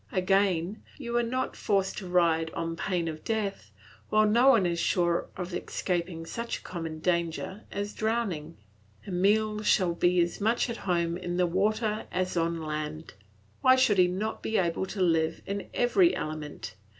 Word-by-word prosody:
Again, 190 0 +1 0.2
you 235 -4 -5
are - - +4
not 255 +2 -2
forced 195 -2 0
to 190 - -8
ride 165 -2 +2
on 165 0 -2
pain 175 -1 -1
of 155 -1 -5
death, 205 - -2 0.4
while 215 0 +4
no 235 +5 +4
one 230 -8 +6
is 170 -1 0
sure 175 -1 +1
of 180 -1 -5
escaping 170 -2 -3
such 235 +7 -4
a - - -15
common 165 -3 -5
danger 170 +4 -1
as 205 +1 -3
drowning. 200 -9 -2 0.5
Emile 210 +3 +2
shall 185 -4 +3
be 175 +1 +2
as 170 +3 0
much 230 +3 +1
at 230 - -5
home 170 -1 +1
in 175 -1 -4
the 180 - +3
water 210 +4 0
as 185 0 -1
on 165 -1 0
land. 155 +1 -5 0.5
Why 255 0 +6
should 220 -7 +3
he 180 - +6
not 200 +5 -3
be 220 - -1
able 175 +1 0
to 190 -1 -1
live 165 -2 +1
in 200 0 -4
every 340 +9 +3
element? 150 -9 -5
185 Hz, 170 wpm, -28 LUFS, 170-215 Hz, 0.5 s, one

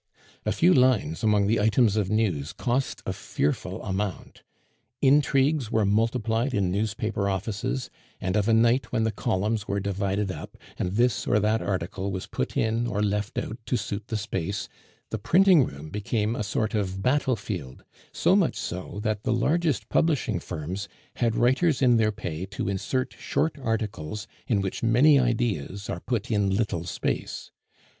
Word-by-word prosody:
A - - +3
few 180 +2 +4
lines 125 - +3
among 105 -2 +3
the 115 +3 +2
items 110 0 +3
of 105 -3 0
news 95 -10 0
cost 130 +1 -1
a - - -2
fearful 75 - -2
amount. 95 0 -4 0.6
Intrigues 140 -1 +3
were 110 -2 +2
multiplied 115 +4 +1
in 95 -3 +1
newspaper 105 0 -1
offices; 105 +6 -2 0.3
and 95 +1 -1
of 105 0 +2
a 115 - +4
night 120 +3 +3
when 115 -2 +1
the 110 - +1
columns 105 +2 -1
were 100 0 0
divided 100 0 -1
up, 75 - -8 0.2
and 90 - -1
this 120 +3 +1
or 105 - +3
that 110 +2 +2
article 95 +1 -2
was 95 -1 -4
put - - -3
in 115 +2 +1
or 105 -2 -1
left 105 0 -1
out 110 - -3
to 125 - +1
suit 105 0 -4
the 110 - -2
space, 100 -2 -3 0.4
the 110 - -2
printing 180 - +5
room 75 +3 -9
became 105 +2 -1
a - - -3
sort 105 +1 -1
of 95 -2 -2
battlefield; 110 - -1 0.3
so - - +3
much - - +2
so, 90 +3 -5
that 110 -2 -1
the - - -1
largest 150 +5 +1
publishing 160 -4 +1
firms 90 +7 -5 0.3
had 115 -2 +1
writers 130 +5 +3
in 125 -3 +5
their 110 -1 +3
pay 90 -3 -5
to 105 - -4
insert 130 +7 -1
short 160 - 0
articles 105 - -3 0.2
in 105 -5 +2
which 95 -1 -3
many 130 +6 +5
ideas 110 - -1
are 85 - -3
put 120 +2 -3
in 100 -2 +2
little 95 -4 -1
space. 90 - -3
110 Hz, 165 wpm, -26 LUFS, 100-120 Hz, 0.6 s, printing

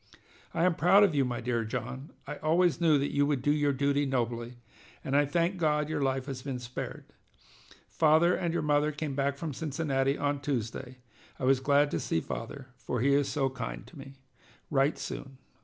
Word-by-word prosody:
"I 165 - 0
am 180 -1 +4
proud 180 +6 +5
of 195 -5 +3
you, 140 -2 +3
my 125 -2 -3
dear 120 -1 -1
John. 125 +4 -5 0.2
I 145 +1 -6
always 170 +2 +2
knew 160 -3 +5
you 145 0 +1
would 140 -4 0
do 145 - +3
your 145 -1 +2
duty 140 +1 +1
nobly, 120 -2 -2 0.5
and 135 - -1
I 145 0 +5
thank 170 +5 0
God 150 -3 +1
your 155 -2 -1
life 135 -1 0
has 135 -2 -5
been 135 -1 -4
spared. 125 0 -6 0.8
Father 160 +2 +4
and 170 -2 -1
your 170 - -1
mother 150 0 +2
came 150 -1 -4
back 140 0 0
from 155 -1 -4
Cincinnati 140 -2 -1
on 145 0 -1
Tuesday. 130 -1 -3 0.4
I - - -8
was 130 0 +4
glad 145 +2 +3
to - - -1
see 80 - 0
father, 130 - -6
for 125 - -3
he 140 +2 +3
is 140 -1 +2
so 140 -3 +1
kind 125 -3 -6
to - - -16
me. 135 0 -11 0.6
Write 140 +1 +2
soon." 135 -1 -7
140 Hz, 195 wpm, -29 LUFS, 130-150 Hz, 0.8 s, proud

